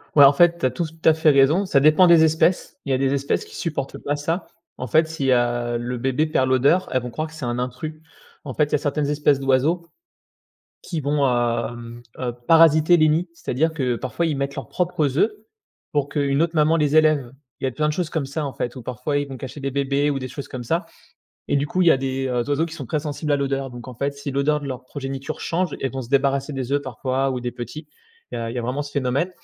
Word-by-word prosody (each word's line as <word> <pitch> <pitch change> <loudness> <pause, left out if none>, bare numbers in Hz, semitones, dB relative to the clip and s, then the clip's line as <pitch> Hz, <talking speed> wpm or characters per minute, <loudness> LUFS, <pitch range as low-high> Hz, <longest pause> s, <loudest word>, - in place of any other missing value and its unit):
Ouais, 145 -2 +9
en 140 - +7
fait, 170 +3 +4
tu - - 0
as 130 - +2
tout 160 +4 -6
à 160 - +7
fait 160 0 +3
raison, 145 +7 +4
ça 145 -7 +3
dépend 155 +6 +6
des 170 -2 +7
espèces. 160 +3 +1
Il 140 - -2
y - - +3
a - - +2
des 135 +1 +1
espèces 140 0 -1
qui - - -13
supportent 150 -5 -4
pas 145 - -2
ça. 160 +5 -3 0.3
En 125 - -5
fait 160 +7 +3
si, 140 -5 -1
heu, 120 -1 +1
le 120 +1 -4
bébé 135 +5 0
perd 130 -4 +1
l'odeur, 140 +8 +3
elles 130 - +1
vont 125 - -6
croire 155 +6 -3
que 155 - -15
c'est 155 -5 -6
un 120 0 -2
intrus. 130 +5 -4 0.5
En 135 - -6
fait, 150 - +2
il 145 - -14
y - - +6
a - - +3
certaines 145 0 -1
espèces 145 -1 +2
d'oiseaux 140 +6 +1 0.9
qui 170 - -4
vont, 145 0 +1
hem, 120 -1 -2 0.2
heu, 125 -2 -2
parasiter 165 +1 +6
les 155 -1 +4
nids, 165 +4 +1
c'est-à-dire 160 0 -1
que 130 -6 -1
parfois 130 +8 -2
ils 160 -3 0
mettent 140 0 -3
leurs 135 - -6
propres 155 -6 -1
œufs, 215 - +3 0.6
pour 145 -1 0
qu'une 140 -1 +1
autre 165 0 0
maman 155 +1 +3
les 150 -1 +1
élève. 155 -6 +3 0.3
Il - - -3
y - - +2
a - - -2
plein 150 +4 0
de - - -1
choses 170 0 -2
comme 155 -3 -2
ça 145 +3 -3
en 135 - -5
fait, 120 - -4
ou 130 - -7
parfois 125 +5 -3
ils 145 0 -1
vont 135 -1 -8
cacher 130 +3 -8
des 135 0 -2
bébés 140 +1 +1
ou 140 -2 -1
des 130 - -5
choses 140 +3 -7
comme 125 -2 -6
ça, 165 +8 -1 0.6
et - - +2
du 140 +1 0
coup 185 +5 0
il 175 - +5
y - - +7
a - - +5
des, 135 0 -2
heu, 125 -1 0
oiseaux 145 +3 +1
qui 165 - -9
sont - - -7
très 155 - -1
sensibles 150 0 -3
à - - +4
l'odeur. 135 -1 -2
Donc 120 0 -10
en 125 - -8
fait 140 +4 -2
si 140 0 -6
l'odeur 140 +2 +1
de 145 - -7
leur 130 -1 -6
progéniture 135 0 -6
change, 175 -1 -1
elles 135 - -1
vont 135 - -4
se 115 - -11
débarrasser 140 +1 +1
des 135 -1 -4
œufs 145 0 +1
parfois 130 +1 -1
ou 125 - -3
des 120 0 -4
petits, 145 +6 -8 0.4
il - - -3
y - - -3
a 115 0 -3
il - - -7
y - - -2
a - - -2
vraiment 125 +5 -2
ce 145 - -9
phénomène. 140 +5 0
140 Hz, 265 wpm, -22 LUFS, 130-155 Hz, 0.9 s, Ouais